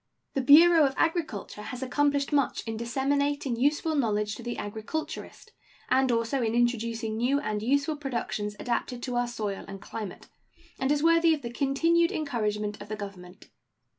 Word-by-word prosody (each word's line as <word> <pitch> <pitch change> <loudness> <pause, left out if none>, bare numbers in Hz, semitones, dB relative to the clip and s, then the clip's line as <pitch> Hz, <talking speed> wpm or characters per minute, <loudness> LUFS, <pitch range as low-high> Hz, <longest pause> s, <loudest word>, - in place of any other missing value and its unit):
The 270 - 0
Bureau 320 +4 +7
of 270 - -5
Agriculture 320 - -1
has 250 +4 -6
accomplished 285 +2 +1
much 280 -2 +1
in 225 -1 -3
disseminating 275 +3 0
useful 295 +6 +1
knowledge 210 -7 0
to 240 - -8
the 240 0 -4
agriculturist, 220 +10 -6 0.4
and 265 -1 +3
also 230 +3 0
in 225 -1 0
introducing 230 -2 0
new 255 +5 +2
and 215 -7 -2
useful 280 +6 +1
productions 235 -7 -3
adapted 245 0 -2
to 250 -2 -3
our 245 0 +1
soil 210 -4 -4
and 195 0 -8
climate, 210 0 -7 0.5
and 265 +2 +1
is 295 0 +1
worthy 330 0 +5
of 290 - -11
the 235 0 -5
continued 330 +6 +2
encouragement 215 - -2
of 205 - -10
the 215 - -2
Government. 195 -2 -10
245 Hz, 165 wpm, -28 LUFS, 220-285 Hz, 0.5 s, Bureau